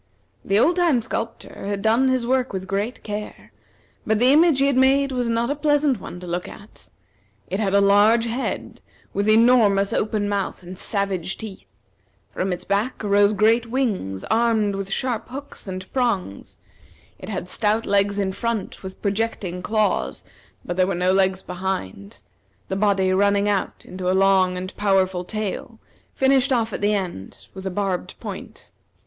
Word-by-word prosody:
The 195 - +1
old 335 +11 +4
time 335 -8 +3
sculptor 225 -3 -5
had 200 -1 -3
done 230 +4 +3
his 255 -2 +1
work 255 -1 0
with 190 -1 -4
great 205 +6 -3
care, 210 0 -7 0.5
but 220 0 +1
the 250 +4 +5
image 320 -1 +5
he 275 - +3
had 280 -1 +2
made 270 +1 +3
was 250 -2 -1
not 230 +3 0
a - - 0
pleasant 290 -4 +2
one 180 - -8
to - - -8
look 175 +1 -3
at. 205 - -14 0.6
It 190 - -1
had 200 -2 +1
a 200 - +5
large 205 +4 +5
head, 240 +3 -4 0.3
with 200 +2 0
enormous 215 -3 +4
open 210 -1 0
mouth 200 -2 -2
and 180 +2 -8
savage 195 -2 -2
teeth; 215 -4 -9 0.7
from 190 +1 -2
its 180 - -4
back 205 +6 -1
arose 205 0 +4
great 225 +3 +3
wings, 215 - -2
armed 220 -2 +2
with 195 0 -4
sharp 240 +2 -2
hooks 275 -3 -9
and 185 0 -5
prongs; 230 - -2 0.6
it - - -9
had 185 -4 -4
stout 215 +4 0
legs 200 0 +2
in 195 -1 0
front, 230 0 -3
with 190 -1 -10
projecting 200 -3 -2
claws; 215 +2 0 0.4
but 175 - -4
there 185 0 +3
were 195 - -1
no 180 +1 +2
legs 190 0 +2
behind, 175 - -5 0.5
the - - -1
body 195 -2 +2
running 200 +1 +2
out 205 -2 -2
into 180 0 -4
a 185 - +2
long 190 -1 +3
and 185 +1 -6
powerful 190 -3 +1
tail, 215 +3 -5 0.4
finished 265 0 +3
off 230 -4 +1
at - - -4
the 210 +1 +2
end 175 - -5
with 190 0 -6
a - - 0
barbed 190 -1 -3
point. - - -9
205 Hz, 170 wpm, -22 LUFS, 190-235 Hz, 0.7 s, the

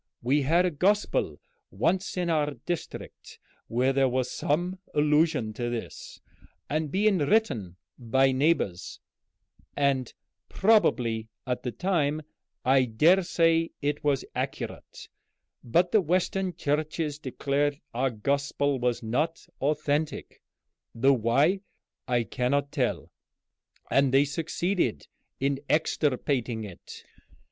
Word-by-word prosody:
We 140 +5 +2
had 165 +6 +3
a 180 - +1
gospel 200 +7 +1 0.3
once 190 0 -1
in 180 -1 0
our 150 -3 0
district 175 -2 -6 0.3
where 125 +3 +1
there 135 -1 +3
was 125 0 -1
some 175 +5 -1 0.2
allusion 150 -6 +2
to 120 +2 -3
this, 120 -1 -6 0.5
and 155 +1 -1
being 195 +3 +2
written 145 - +1 0.2
by 130 +3 +3
neighbors, 130 - 0 0.8
and 135 -3 +1 0.4
probably 120 - +2 0.2
at 125 -1 -2
the 125 - -3
time, 155 -3 0 0.4
I 130 0 +4
dare 155 +12 +4
say 165 -2 +2
it 145 0 -2
was 140 -3 +1
accurate; - - -5 0.6
but 175 +9 +2
the 215 - +5
Western 185 +1 0
Churches 150 -1 -2
declared 140 +1 -1
our 130 +3 +1
gospel 140 +4 -1
was 120 -1 -1
not 150 +9 -1 0.2
authentic, 150 +1 -1 0.5
though 135 +4 +4
why 135 - +2 0.5
I 120 -2 +2
cannot 140 +4 -1
tell, - - -2 0.8
and 135 -1 +3
they 135 +2 +5
succeeded 165 - -1 0.3
in 140 0 0
extirpating 130 -6 0
it. 95 -5 -10
145 Hz, 115 wpm, -27 LUFS, 125-165 Hz, 0.8 s, the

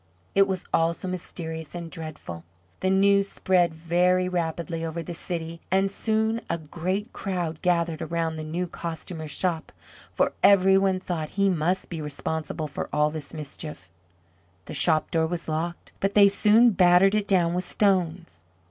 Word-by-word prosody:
It 195 0 +5
was 190 -2 -3
all 165 +1 +3
so 185 - -7
mysterious 160 -3 -6
and 170 -1 -6
dreadful. 155 - -7 0.4
The 185 - 0
news 200 +1 +4
spread 180 -2 +2
very 175 +3 +1
rapidly 165 -2 -2
over 165 +1 -4
the 175 - -6
city, 165 -1 -5
and 195 +1 +2
soon 220 +2 0
a - - 0
great 180 +7 -4
crowd 175 -5 -3
gathered 170 -2 +1
around 165 -1 -2
the 155 - -5
new 165 +4 -2
Costumer's 165 -2 -6
shop 165 +1 -1 0.4
for - - +1
every 195 -1 +6
one 195 -1 +2
thought 165 -4 -4
he 200 0 +4
must 180 +2 0
be 165 -2 -4
responsible 155 +1 -4
for 145 - -5
all 150 0 +2
this 155 -2 -7
mischief. 150 - -8 0.7
The - - -8
shop 155 +2 +2
door 160 -1 +2
was 170 0 -4
locked; 165 +2 -3
but 195 +1 -1
they 200 -1 +8
soon 220 +4 +5
battered 180 +1 +5
it 210 -1 0
down 175 -3 +3
with 180 +1 -1
stones. 180 - 0
170 Hz, 165 wpm, -26 LUFS, 160-190 Hz, 0.7 s, they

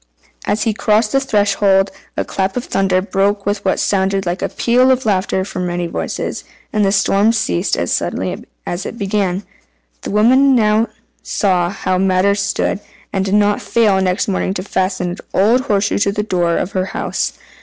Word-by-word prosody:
As 210 - +1
he 225 - +1
crossed 215 +1 +1
the 270 - +3
threshold, 205 -5 +2 0.3
a - - 0
clap 190 +3 -2
of 250 - -3
thunder 190 -1 +1
broke 200 0 0
with 205 +1 -1
what 190 - +1
sounded 195 -1 0
like 175 +1 -2
a - - -1
peal 250 +2 +2
of 260 -1 +2
laughter 190 -2 0
from 180 -2 -4
many 175 0 -2
voices, 170 - -4 0.3
and 210 -1 +2
then 195 - +3
the - - 0
storm 200 +2 +3
ceased 90 - 0
as - - -1
suddenly - - -2 0.2
as 175 +3 -3
it - - -5
had - - -13
begun. 195 -2 -1 0.6
The - - -6
woman 260 +6 +4
now 215 0 +3 0.3
saw 180 -4 +1
how 185 -1 -1
matters 195 +2 +2
stood, - - -1 0.3
and 190 - 0
did 195 +1 0
not 205 0 +2
fail 210 -5 +2
next 185 0 0
morning 190 -1 -1
to 185 - -3
fasten 185 -2 -1
an 180 - -6 0.2
old 225 +6 +4
horseshoe 205 -6 +1
to 200 0 +2
the 210 +1 -2
door 175 -4 0
of 185 - -2
her 185 -1 -1
house. - - -2
200 Hz, 190 wpm, -17 LUFS, 190-210 Hz, 0.6 s, woman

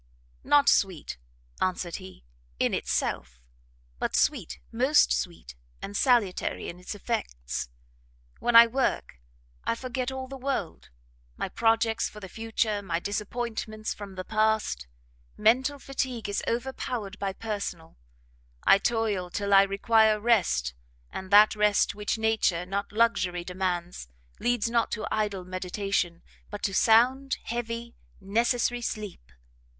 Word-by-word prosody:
"Not 290 -1 +4
sweet," 180 - +1 0.4
answered 180 -2 -1
he, 185 - -12 0.3
"in - - +1
itself; 60 +1 -2 0.6
but - - -1
sweet, - - +1
most 265 +6 +4
sweet 170 - -4 0.3
and 200 - -7
salutary 235 -6 +1
in 175 - -9
its 180 +3 -6
effects. 65 - -3 0.7
When 240 - 0
I 230 0 +11
work, 235 - -1 0.4
I - - 0
forget 255 +1 -3
all 265 0 -5
the 270 0 -8
world; 265 -10 -3 0.5
my - - -3
projects 225 0 +1
for 210 - -11
the 195 - -8
future, 225 0 -1
my 170 -4 -2
disappointments 215 +2 -3
from 200 -2 -9
the 185 - -5
past. 220 - 0 0.5
Mental 260 +7 +3
fatigue 260 -5 -3
is 205 - -1
overpowered 235 -4 -3
by 195 -1 -1
personal; 200 -6 -5 0.7
I 195 - +6
toil 210 -5 0
till 200 +2 -1
I 195 - +9
require 215 +2 +3
rest, 180 - +2 0.4
and 190 - -6
that 210 +2 +7
rest 210 -1 +3
which 210 +2 -2
nature, 220 -6 +1
not 200 +2 -3
luxury 200 -6 +1
demands, 180 - -3 0.3
leads 240 -2 +1
not 230 0 +1
to 215 - -3
idle 205 -4 -1
meditation, 185 -1 -2 0.3
but 205 - -7
to 195 - 0
sound, 250 +6 +4
heavy, 235 0 -4 0.3
necessary 235 +4 +1
sleep. 205 - -5
210 Hz, 130 wpm, -27 LUFS, 190-235 Hz, 0.7 s, I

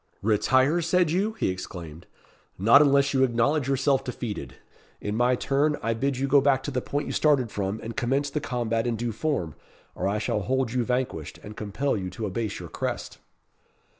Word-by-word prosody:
"Retire, 130 - +3
said 170 0 +2
you?" 200 +6 +1
he 225 - -1
exclaimed; 85 -3 -7 0.5
"not 115 +9 +7
unless 140 -1 +4
you 130 -1 +3
acknowledge 130 +3 +1
yourself 135 0 +2
defeated. 110 - -5 0.4
In 105 +1 -3
my 120 +2 +3
turn, 145 +4 +1
I 115 +1 +1
bid 135 +3 -1
you 135 +2 0
go 140 +1 +5
back 135 -1 +2
to 145 - -3
the 125 -2 -1
point 145 +3 -2
you - - -4
started 140 -7 +2
from, 100 +1 -2
and 115 0 -6
commence 135 +3 0
the 150 - -2
combat 115 -3 -1
in 120 - 0
due 120 +1 -2
form, 110 - -2 0.4
or - - -2
I 100 +2 0
shall 105 0 -1
hold 130 +1 0
you 125 -1 +1
vanquished, 125 - -2
and 105 +1 -9
compel 110 +8 -1
you 95 -3 -3
to 100 +5 -5
abase 105 +1 -3
your - - -8
crest." - - -4
125 Hz, 195 wpm, -26 LUFS, 105-140 Hz, 0.5 s, not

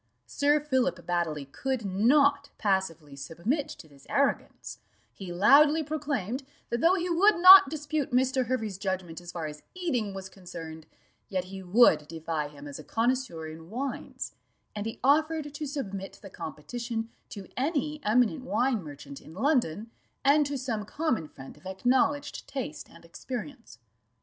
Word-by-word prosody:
Sir 290 +1 +2
Philip 260 - 0
Baddely 165 -5 -1
could 255 - -3
not 280 +9 +3
passively 170 -8 -1
submit 170 - -2
to 160 - -10
this 140 -2 -19
arrogance; 280 0 -1 0.3
he 190 -3 -8
loudly 290 - +5
proclaimed, 285 -6 -2 0.3
that 235 0 -1
though 345 +3 +5
he 360 -1 -1
would 375 +5 +4
not 365 -3 +10
dispute 295 -1 -2
Mr. 260 0 +2
Hervey's 220 -6 -2
judgment 185 -4 -3
as 175 0 -9
far 170 -3 -4
as 150 0 -7
eating 245 - -2
was 190 -1 -6
concerned, 165 -4 -9 0.4
yet 185 -2 -1
he 190 +1 -8
would 180 -6 +4
defy 160 -1 -3
him 145 0 -11
as 140 - -7
a - - -9
connoisseur 230 -8 -1
in 160 +1 -10
wines, 260 +5 -5 0.4
and 210 +1 -3
he 225 +1 -6
offered 305 +1 +2
to 300 0 -4
submit 200 -9 -5
the 195 - -10
competition 230 +9 -5 0.2
to 200 -3 -8
any 300 +2 -1
eminent 245 +5 +2
wine 255 -3 +1
merchant 145 -2 -10
in 160 - -13
London, 230 - 0 0.3
and 290 +1 +5
to 285 0 -3
some 240 -5 -3
common 250 - -1
friend 135 -2 -12
of 185 - -12
acknowledged 260 +8 0
taste 255 - -5
and 170 0 -16
experience. 235 - -7
230 Hz, 155 wpm, -28 LUFS, 175-280 Hz, 0.4 s, not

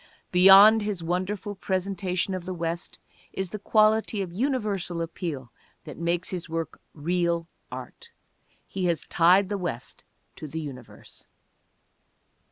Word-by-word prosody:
Beyond 195 +4 +8
his 205 -5 -3
wonderful 185 +4 -2
presentation 190 -1 -2
of 185 -2 -5
the 185 0 -4
West 170 +1 -4 0.4
is 190 -2 -4
the 215 - -5
quality 215 0 +2
of 175 -2 -8
universal 210 -7 -1
appeal 165 - -5 0.3
that 150 -5 -9
makes 170 +1 -1
his 180 -2 -5
work 165 0 -4
real 170 +1 0 0.2
art. 465 - -9 0.6
He 190 -2 -4
has 170 -3 0
tied 180 +3 +4
the 200 0 -3
West 165 -10 -5 0.3
to 155 - -7
the 160 +3 -5
universe. 135 -6 -10
180 Hz, 130 wpm, -26 LUFS, 170-200 Hz, 0.6 s, Beyond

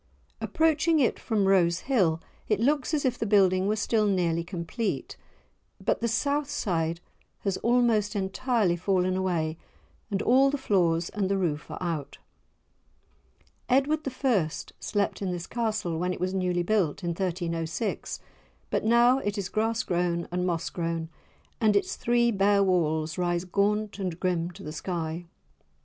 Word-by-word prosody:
Approaching 320 0 +2
it 255 - +2
from 215 -4 0
Rose 175 -3 +3
Hill, 185 -12 +2 0.3
it 210 -2 +1
looks 280 +5 +1
as 300 -3 0
if 250 -1 0
the 225 - -1
building 190 -2 +4
were 210 - +2
still 215 0 +1
nearly 170 -4 +1
complete, 175 +6 -3 0.6
but - - 0
the 235 - +1
south 280 +5 0
side 165 - -1 0.4
has 195 -2 -1
almost 230 -4 +2
entirely 200 0 +1
fallen 185 +1 +1
away 170 -4 -1 0.5
and 200 -1 -1
all 265 +3 +5
the 290 - -1
floors 175 -9 +1
and 200 -2 -2
the 195 - +1
roof 155 -6 -2
are - - -6
out. 165 -6 -3 1.5
Edward 275 +4 +3
I. 250 - +1 0.3
slept 205 -1 -1
in 195 - -1
this 175 -1 -4
Castle 215 -8 -2
when 180 +1 0
it - - -7
was 185 +1 -1
newly 180 -2 0
built, 190 -4 0
in 175 - -1
1306; 170 +1 -2 0.5
but - - 0
now 240 +3 +5
it 205 -3 -3
is 195 -2 -3
grass 225 +1 0
grown 175 -2 -1
and 180 +1 -1
moss 170 -2 -2
grown, 165 -1 -3 0.5
and 215 -3 +3
its 200 - +1
three 235 0 +2
bare 200 -1 +3
walls 160 -3 +1
rise 175 0 0
gaunt 205 +3 0
and 180 -3 -3
grim 175 -2 0
to 180 - -12
the 150 - -6
sky. 165 0 -4
190 Hz, 155 wpm, -27 LUFS, 175-225 Hz, 1.5 s, all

